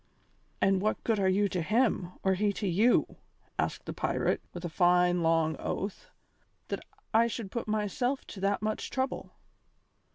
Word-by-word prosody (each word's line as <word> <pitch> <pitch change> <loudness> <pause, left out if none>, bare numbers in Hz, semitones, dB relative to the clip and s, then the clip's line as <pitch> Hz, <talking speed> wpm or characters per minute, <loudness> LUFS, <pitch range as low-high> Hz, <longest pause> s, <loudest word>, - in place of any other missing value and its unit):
"And 195 -1 +3
what 215 +2 0
good 225 -3 +1
are 190 -1 +3
you 200 +2 +3
to 180 - -1
him, 210 -2 +1
or 190 - +3
he 205 +2 +1
to 205 - -3
you," 210 +8 +3 0.4
asked - - -1
the - - -4
pirate, - - 0
with 175 0 -7
a - - 0
fine 180 +1 +3
long 165 -1 +2
oath, 195 +1 -4 0.6
"that - - -2 0.3
I 230 +1 +5
should 225 -4 -5
put 235 - -3
myself 215 +5 -1
to 195 - -9
that 200 +2 0
much 215 0 -2
trouble?" 260 0 -3
195 Hz, 165 wpm, -30 LUFS, 180-220 Hz, 0.6 s, I